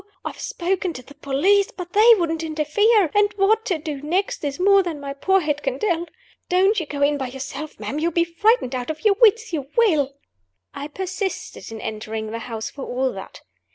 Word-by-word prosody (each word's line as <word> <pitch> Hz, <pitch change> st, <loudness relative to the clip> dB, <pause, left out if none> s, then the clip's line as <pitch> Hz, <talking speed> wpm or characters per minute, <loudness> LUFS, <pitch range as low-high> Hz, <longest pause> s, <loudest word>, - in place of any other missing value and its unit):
I've -, -, -6 dB
spoken 365 Hz, 0 st, -2 dB
to 255 Hz, -, -9 dB
the 285 Hz, -, -15 dB
police; 310 Hz, +9 st, +2 dB
but 360 Hz, -1 st, -9 dB
they 455 Hz, +3 st, +7 dB
wouldn't 330 Hz, -3 st, -1 dB
interfere; 325 Hz, +5 st, +2 dB
and 415 Hz, 0 st, +3 dB
what 435 Hz, +3 st, +2 dB
to 370 Hz, -8 st, 0 dB
do 300 Hz, -3 st, -6 dB
next 380 Hz, +10 st, -1 dB
is 285 Hz, +1 st, -3 dB
more 395 Hz, +1 st, +5 dB
than 340 Hz, -5 st, -4 dB
my 280 Hz, -1 st, -5 dB
poor 380 Hz, +7 st, +2 dB
head 295 Hz, -2 st, -1 dB
can -, -, -2 dB
tell. 345 Hz, -5 st, -1 dB, 0.4 s
Don't 385 Hz, +4 st, +3 dB
you 325 Hz, -, -5 dB
go 285 Hz, -1 st, -2 dB
in 290 Hz, 0 st, +2 dB
by 265 Hz, -, -2 dB
yourself, 275 Hz, +4 st, -7 dB
ma'am! 290 Hz, -, -4 dB
You'll 335 Hz, +2 st, 0 dB
be 340 Hz, +1 st, +2 dB
frightened 340 Hz, -, +1 dB
out 250 Hz, +1 st, -3 dB
of 315 Hz, +6 st, -6 dB
your 420 Hz, -, +6 dB
wits 450 Hz, -2 st, +4 dB
you 285 Hz, -4 st, -2 dB
will!" 305 Hz, -, +3 dB, 0.6 s
I 285 Hz, -, -6 dB
persisted 375 Hz, -, -5 dB
in 225 Hz, -, -7 dB
entering 220 Hz, 0 st, -5 dB
the 230 Hz, -, -4 dB
house, 225 Hz, -1 st, -5 dB
for 275 Hz, -, -8 dB
all 260 Hz, +1 st, -1 dB
that. -, -, -10 dB
330 Hz, 205 wpm, -22 LUFS, 280-390 Hz, 0.6 s, they